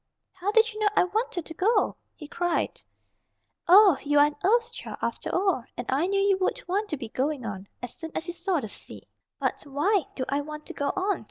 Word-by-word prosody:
"How 375 +2 -2
did 450 +1 +4
you 430 - -8
know 430 - +3
I - - +5
wanted 370 -2 -2
to 325 - -8
go?" 400 +8 +2 0.2
he 300 - -10
cried. 350 +2 -1 0.9
"Oh, 380 -3 +8
you 290 0 +1
are 290 - +8
an 295 - -2
Earth 460 +4 +3
Child, - - -7
after - - -3
all, 370 -9 +1
and 245 - -4
I 285 +7 +2
knew 395 +1 +1
you 395 -1 +3
would 375 - +1
want 410 +4 -1
to 300 - -2
be 235 -4 -7
going 265 +1 -2
on, 200 -2 -6 0.2
as 245 - -5
soon 325 -2 -7
as 320 - -2
you 345 - -4
saw 350 0 0
the 220 - -5
sea." - - -10 0.3
"But - - -1
why 305 +6 +1
do 260 - -2
I 280 +1 0
want 300 +1 -8
to - - -7
go 285 - -2
on?" 385 0 0
350 Hz, 230 wpm, -27 LUFS, 290-400 Hz, 0.9 s, Oh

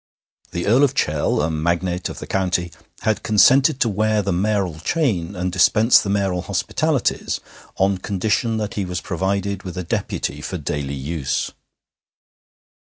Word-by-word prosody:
The 85 - -3
Earl 120 +7 +4
of 140 -1 +2
Chell, 75 - +1
a 80 - 0
magnate 85 +3 -1
of - - -8
the - - -7
county, 90 -2 -1 0.3
had 110 -1 0
consented 130 +7 +4
to - - +4
wear 110 +1 +1
the 100 - -1
mayoral 95 -3 0
chain 100 - -1
and 90 0 -2
dispense 105 +6 +5
the 100 - -4
mayoral 100 -3 0
hospitalities - - -1 0.4
on 95 0 +2
condition 105 +4 0
that 105 -2 -3
he 100 - -2
was 90 -1 -3
provided 100 +2 -2
with 90 -2 -8
a 90 - -2
deputy 85 - -3
for - - -4
daily 70 -1 -3
use. 70 0 -2
95 Hz, 155 wpm, -21 LUFS, 85-105 Hz, 0.4 s, dispense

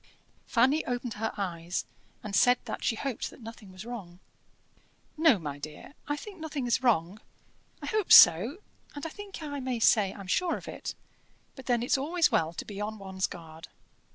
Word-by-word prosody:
Fanny 265 +6 +3
opened 245 -2 -2
her 220 +2 -2
eyes, 175 -3 -3 0.4
and 210 -2 -4
said 245 +4 +5
that - - -5
she 225 - +1
hoped 260 +1 -3
that - - -15
nothing 225 -4 -11
was 185 +3 -10
wrong. 200 -8 -8 1.0
"No, 315 -7 +5
my 145 -5 -6
dear, 155 - -9
I 290 - 0
think 385 +4 -10
nothing 300 -4 -4
is 240 +1 +1
wrong: 210 -4 +1 0.6
I - - -3
hope 430 -4 -1
so, 210 - +8 0.4
and 290 - -6
I - - -3
think 400 -1 -9
I 285 -2 -4
may 255 -2 -2
say 210 -3 +4
I'm 195 - -10
sure 340 - +1
of - - -12
it; - - -6 0.6
but 265 - -12
then 240 -2 +2
it's 255 - +2
always 330 +4 +2
well 160 0 +2
to 170 - -7
be 205 -1 -7
on 215 +1 -4
one's 190 -1 -3
guard." 160 -2 -11
230 Hz, 185 wpm, -29 LUFS, 190-280 Hz, 1.0 s, so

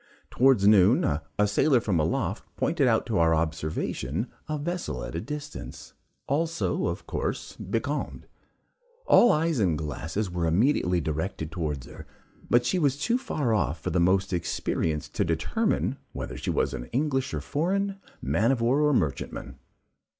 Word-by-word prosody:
Towards 125 -6 +4
noon, 105 +2 +6
a 75 +3 0
sailor 130 +5 +3
from 100 -7 0
aloft 75 - -1
pointed 155 -5 +1
out 115 -2 +2
to 110 -7 0
our 80 0 +4
observation 80 - -2 0.2
a 155 - -1
vessel 155 - -3
at - - -6
a 85 - -3
distance, 150 +3 -7 0.3
also, 165 +4 0
of - - -4
course, - - -3
becalmed. - - -3 0.8
All 240 - +6
eyes 160 -2 +1
and 90 -7 +2
glasses 80 +6 -3
were 85 -1 -1
immediately 90 - +2
directed 80 +1 -3
towards 75 -6 -3
her, - - -11 0.4
but 120 0 +4
she 180 +9 +1
was 140 -4 +2
too 235 - +1
far 145 - -1
off 85 -7 0
for - - -3
the 90 - +1
most 95 +2 +2
experienced 80 -2 -2
to - - +1
determine 125 - 0 0.2
whether - - -5
she - - -4
was - - +1 0.2
English 135 0 0
or - - -2
foreign, 195 +6 -1 0.3
man 115 +5 +2
of 135 - 0
war 125 +5 +2
or 150 -1 +3
merchantman. 70 - -2
105 Hz, 155 wpm, -27 LUFS, -, 0.8 s, noon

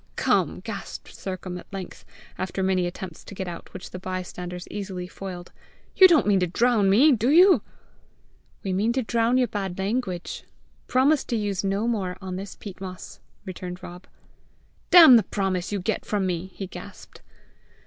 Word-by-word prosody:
Come!" - - +1
gasped - - -7
Sercombe 185 -1 -6
at - - -16
length, 195 -2 -8 0.3
after 190 0 -3
many 185 -1 +1
attempts 175 -1 -8
to 200 - -11
get 190 -1 -4
out 170 -1 -8
which, 185 - -9
the 185 - -7
bystanders 180 -1 -6
easily 190 -3 -5
foiled 180 -1 -8 0.4
"you 380 - +9
don't 335 -5 +4
mean 200 -2 +3
to 180 - +1
drown 220 +2 +2
me, 255 +11 +6
do 240 -1 +2
you?" 360 +5 +7 1.0
"We 190 - -2
mean 210 +5 +1
to 260 0 0
drown 230 +2 +1
your 255 -1 +3
bad 195 -5 -4
language. 195 -3 -3 0.4
Promise 270 +3 +3
to 235 - -2
use 205 -3 -1
no 200 +3 0
more 190 -6 -2
on 190 -1 -6
this 195 +1 -7
peat 195 -3 -10
moss," 185 -1 -8 0.3
returned 180 0 -7
Rob. 175 +1 -10 0.8
"Damn 320 -9 +10
the - - +4
promise 190 -1 -2
you 205 - -1
get 205 +4 -2
from 205 -2 -1
me!" 180 0 -2
he 195 - -5
gasped. 190 - -11
195 Hz, 170 wpm, -25 LUFS, 185-225 Hz, 1.0 s, Damn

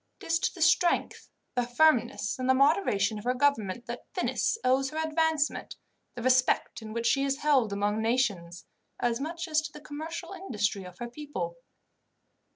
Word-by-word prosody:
It - - -11
is 330 0 +1
to - - -1
the 335 - 0
strength, 345 +1 +2 0.2
the 245 - +1
firmness, 245 -1 +2
and 255 0 -1
the 260 - +6
moderation 260 - +2
of - - -10
her 250 +1 0
government 240 -6 +1
that 240 0 -7
Venice - - 0
owes 265 +1 +2
her 310 - -7
advancement, 320 -1 0 0.4
the 240 - -6
respect 255 -1 +2
in 215 -1 -8
which 230 +1 -3
she 275 +3 +3
is 275 0 0
held 265 -8 +3
among 205 +2 0
nations, 205 -8 -1 0.3
as 240 0 0
much 335 +5 -4
as 310 -1 +2
to 305 -1 -7
the 300 - -10
commercial 315 +4 -7
industry 210 - -2
of 180 -1 -11
her 240 - -5
people. 235 - -5
260 Hz, 175 wpm, -28 LUFS, 225-310 Hz, 0.4 s, the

